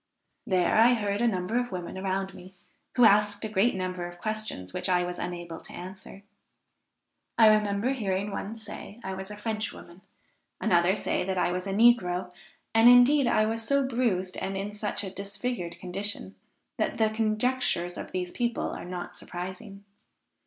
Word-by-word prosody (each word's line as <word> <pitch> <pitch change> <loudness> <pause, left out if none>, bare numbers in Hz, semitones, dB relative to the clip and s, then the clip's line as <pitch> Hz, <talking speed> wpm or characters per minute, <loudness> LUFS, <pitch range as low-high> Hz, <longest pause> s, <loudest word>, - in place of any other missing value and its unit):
There 185 -4 +2
I 240 +2 +6
heard 205 -1 -1
a 240 - +4
number 200 +3 0
of 245 -2 -3
women 180 -1 -5
around 190 0 -2
me, 185 +1 -13 0.4
who 245 - +6
asked 205 0 +4
a - - -1
great 215 +2 +2
number 185 -1 -3
of 175 0 -11
questions 215 - -4
which - - -1
I 180 -1 +3
was 180 0 -4
unable 175 -2 -5
to - - -12
answer. 190 +2 -10 1.1
I 225 - +7
remember 215 +2 +3
hearing 200 -5 -1
one 210 +3 -5
say 220 0 -9
I 190 - -4
was 190 +1 -6
a 210 - -8
French 215 0 -3
woman; 170 +2 -13 0.6
another 180 -2 +3
say - - -1
that 190 0 -2
I 180 - +2
was 180 +2 -3
a - - -2
negro, 195 -5 +3 0.4
and 225 +1 +7
indeed 250 +3 +6
I 215 -2 +3
was 225 +1 -1
so 275 +3 +2
bruised, 215 -8 0
and 195 0 -3
in 200 +2 -4
such 210 0 -2
a 190 - -5
disfigured 200 -3 -4
condition, 185 - -3 0.5
that - - 0
the 220 -1 +2
conjectures 220 -4 0
of - - -7
these 180 -1 -3
people 240 -1 -1
are - - -7
not 180 0 -6
surprising. 185 +3 -7
200 Hz, 175 wpm, -28 LUFS, 185-225 Hz, 1.1 s, I